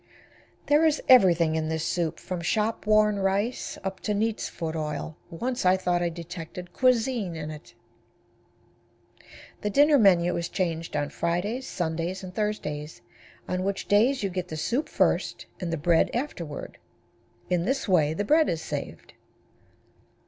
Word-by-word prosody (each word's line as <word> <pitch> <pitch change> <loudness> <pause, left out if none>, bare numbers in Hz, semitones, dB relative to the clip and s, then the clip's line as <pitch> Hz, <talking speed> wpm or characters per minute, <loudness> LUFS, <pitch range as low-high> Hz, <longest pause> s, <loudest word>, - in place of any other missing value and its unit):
There 295 +2 +4
is 310 -2 +3
everything 175 -10 +6
in 160 0 -1
this 160 -1 -2
soup, 170 -3 -1
from 180 -2 -5
shop 210 +5 -1
worn 215 -1 +4
rice 195 +5 -1
up 190 -1 -4
to 210 - -2
neat's 220 +1 -1
foot 165 -2 -5
oil. 155 0 -4
Once 245 +9 -3
I 185 +1 +4
thought 180 -1 0
I 175 - +1
detected 170 +1 -8
cuisine 240 -7 +1
in 155 -1 -5
it. 150 0 -12 1.9
The 210 - -1
dinner 290 +5 +5
menu 180 -4 +4
is 170 0 -3
changed 165 -3 -2
on 145 0 -1
Fridays, 205 +10 -2
Sundays 170 +2 -3
and 185 -1 -8
Thursdays, 150 - -3 0.5
on 185 0 -1
which 200 0 -2
days 230 +5 +3
you 195 - -1
get 180 0 -3
the 155 - -6
soup 250 - -1
first - - 0
and 175 -3 -3
the 165 - -1
bread 165 +2 +3
afterward. 175 - -5 0.7
In 175 -1 +1
this 265 +2 -1
way 160 -5 +3
the 205 - -2
bread 310 +6 +4
is 165 -1 -2
saved. - - -6
185 Hz, 155 wpm, -26 LUFS, 165-215 Hz, 1.9 s, everything